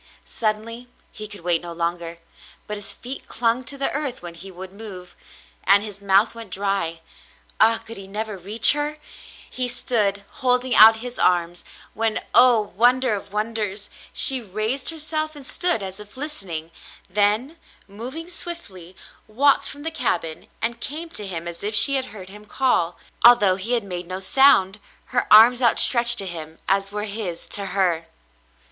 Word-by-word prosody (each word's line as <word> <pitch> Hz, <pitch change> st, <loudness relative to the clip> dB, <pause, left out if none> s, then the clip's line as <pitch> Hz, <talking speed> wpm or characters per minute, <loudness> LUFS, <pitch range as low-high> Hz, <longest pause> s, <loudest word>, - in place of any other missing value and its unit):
Suddenly 230 Hz, +2 st, -4 dB, 0.2 s
he 215 Hz, 0 st, -8 dB
could 205 Hz, -2 st, -11 dB
wait 170 Hz, -1 st, +2 dB
no 175 Hz, -1 st, -8 dB
longer, 170 Hz, 0 st, -4 dB, 0.5 s
but 210 Hz, -, -5 dB
his 205 Hz, -1 st, -4 dB
feet 260 Hz, +3 st, -8 dB
clung 235 Hz, +2 st, 0 dB
to 280 Hz, -, -4 dB
the 275 Hz, -, 0 dB
earth 280 Hz, -8 st, -4 dB
when 175 Hz, -1 st, -8 dB
he 175 Hz, +3 st, -10 dB
would 185 Hz, +1 st, -10 dB
move, 195 Hz, -4 st, -10 dB, 0.5 s
and 200 Hz, +2 st, +5 dB
his 205 Hz, -2 st, -9 dB
mouth 200 Hz, +3 st, +3 dB
went 230 Hz, -3 st, -10 dB
dry. 190 Hz, -3 st, -2 dB, 0.6 s
Ah, 225 Hz, +1 st, +4 dB
could 230 Hz, -, -11 dB
he 195 Hz, -1 st, -10 dB
never 215 Hz, +1 st, -5 dB
reach 200 Hz, +5 st, +3 dB
her? 295 Hz, +1 st, -3 dB, 0.5 s
He 255 Hz, -1 st, -3 dB
stood 210 Hz, -5 st, -1 dB
holding 250 Hz, +1 st, 0 dB
out 220 Hz, +1 st, +9 dB
his 245 Hz, 0 st, -7 dB
arms, 175 Hz, -1 st, +1 dB, 0.3 s
when, 225 Hz, 0 st, -1 dB
oh, 235 Hz, -6 st, +4 dB
wonder 250 Hz, +2 st, +3 dB
of 200 Hz, -1 st, -6 dB
wonders! 210 Hz, -1 st, -4 dB, 0.2 s
she 265 Hz, -2 st, +1 dB
raised 215 Hz, +6 st, -2 dB
herself 310 Hz, -1 st, -2 dB
and 285 Hz, -2 st, -11 dB
stood 350 Hz, -, +1 dB
as 190 Hz, +1 st, -7 dB
if 210 Hz, +3 st, -12 dB
listening, 190 Hz, -, -5 dB, 0.4 s
then, 210 Hz, -, 0 dB, 0.3 s
moving 250 Hz, -, -8 dB
swiftly, 205 Hz, -, -9 dB, 0.3 s
walked 275 Hz, +6 st, +2 dB
from 290 Hz, +1 st, -10 dB
the 325 Hz, -, -2 dB
cabin 165 Hz, -, -3 dB, 0.2 s
and 235 Hz, +1 st, -2 dB
came 320 Hz, +4 st, -6 dB
to 210 Hz, -, -8 dB
him 170 Hz, -2 st, -6 dB
as 170 Hz, 0 st, -8 dB
if 210 Hz, +1 st, -3 dB
she 275 Hz, -, +6 dB
had 265 Hz, -1 st, +1 dB
heard 195 Hz, -6 st, -11 dB
him 210 Hz, +2 st, -13 dB
call, 205 Hz, -8 st, 0 dB, 0.3 s
although 225 Hz, -6 st, +7 dB
he 205 Hz, +6 st, -4 dB
had 235 Hz, -3 st, +1 dB
made 180 Hz, -3 st, -6 dB
no 185 Hz, +1 st, -5 dB
sound 195 Hz, -2 st, +4 dB
— -, -, -33 dB
her 245 Hz, -, -1 dB
arms 235 Hz, +4 st, +8 dB
outstretched 235 Hz, 0 st, +6 dB
to 195 Hz, -, +4 dB
him 160 Hz, -3 st, -7 dB
as 195 Hz, 0 st, 0 dB
were 210 Hz, 0 st, -4 dB
his 200 Hz, -5 st, -4 dB
to 200 Hz, -1 st, -3 dB
her. 180 Hz, -4 st, 0 dB
210 Hz, 170 wpm, -22 LUFS, 190-245 Hz, 0.6 s, out